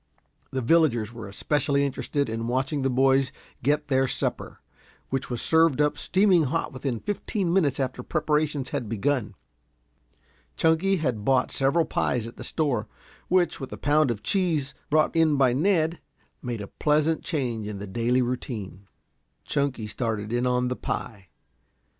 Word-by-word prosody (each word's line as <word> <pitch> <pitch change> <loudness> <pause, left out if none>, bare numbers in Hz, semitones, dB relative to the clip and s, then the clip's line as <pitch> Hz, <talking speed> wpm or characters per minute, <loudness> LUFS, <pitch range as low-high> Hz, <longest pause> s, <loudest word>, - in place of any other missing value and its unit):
The 130 -1 -3
villagers 120 -6 +3
were 115 -3 -8
especially 140 +7 0
interested 140 +1 -2
in 115 +1 -3
watching 130 +4 -1
the 135 - +1
boys 135 +1 +3 0.3
get 150 +3 +1
their 135 -1 +2
supper, - - -3 0.5
which 135 0 -2
was 120 -2 -1
served 160 -3 +4
up 150 0 +2
steaming 185 -4 +3
hot 160 +3 -2
within 130 -3 -3
fifteen 200 -3 -2
minutes 150 -7 +2
after 130 -2 -2
preparations 150 -2 0
had 115 - -3
begun. 125 +2 -1 1.2
Chunky 165 +4 +3
had 130 - -1
bought 130 +1 +2
several 140 +5 +2
pies 120 -5 -1
at 115 - -9
the - - -9
store, 130 -9 -1 0.4
which, 180 -1 +2
with 135 - -7
a - - -6
pound 150 0 +3
of 105 -3 -3
cheese 160 - 0 0.2
brought 155 +2 +2
in 160 -2 +4
by 130 -3 +4
Ned, 165 +2 +1 0.4
made 120 -4 -4
a 100 - -6
pleasant 155 +5 +1
change 120 - -2
in 105 -1 -5
the 100 - -6
daily 120 +5 +1
routine. 110 -6 -5 0.6
Chunky 140 -6 -1
started 110 -1 -3
in 120 +1 +1
on 125 0 +1
the 125 - -2
pie. 100 -6 -5
135 Hz, 155 wpm, -26 LUFS, 120-155 Hz, 1.2 s, served